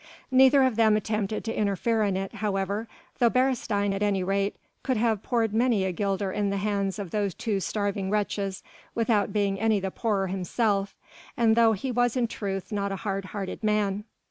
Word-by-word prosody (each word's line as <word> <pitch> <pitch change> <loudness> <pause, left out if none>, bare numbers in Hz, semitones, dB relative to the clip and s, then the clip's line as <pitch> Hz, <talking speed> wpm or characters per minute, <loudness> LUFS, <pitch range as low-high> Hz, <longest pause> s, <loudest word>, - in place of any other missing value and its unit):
Neither 265 +1 +6
of 255 -4 +1
them 220 -2 +5
attempted 215 0 -2
to 225 - -3
interfere 215 +2 0
in 200 -3 +1
it, 195 0 -4
however, 200 +1 -1 0.3
though 240 - +5
Beresteyn 230 -6 +1
at 195 - -3
any 200 -2 +1
rate 195 +2 0 0.3
could 260 -3 0
have 220 -2 +1
poured 225 -3 0
many 225 -4 +2
a 190 - 0
guilder 195 +1 -1
in 205 +1 0
the 200 - -1
hands 200 -1 -1
of 200 -5 -6
those 200 -5 -1
two 215 -4 -1
starving 200 -1 -2
wretches, 200 -2 -1 0.3
without 225 -3 +1
being 200 -2 0
any 220 -1 +2
the 190 0 -3
poorer 205 -4 0
himself 195 +2 -1 0.4
and 225 -2 +4
though 230 -1 +5
he 235 +6 -3
was 245 0 +1
in 245 - +2
truth 195 -3 -4
not 200 -1 -1
a - - -2
hard 195 -1 -2
hearted 195 +2 -6
man. 210 -1 +1
205 Hz, 190 wpm, -27 LUFS, 195-225 Hz, 0.4 s, Neither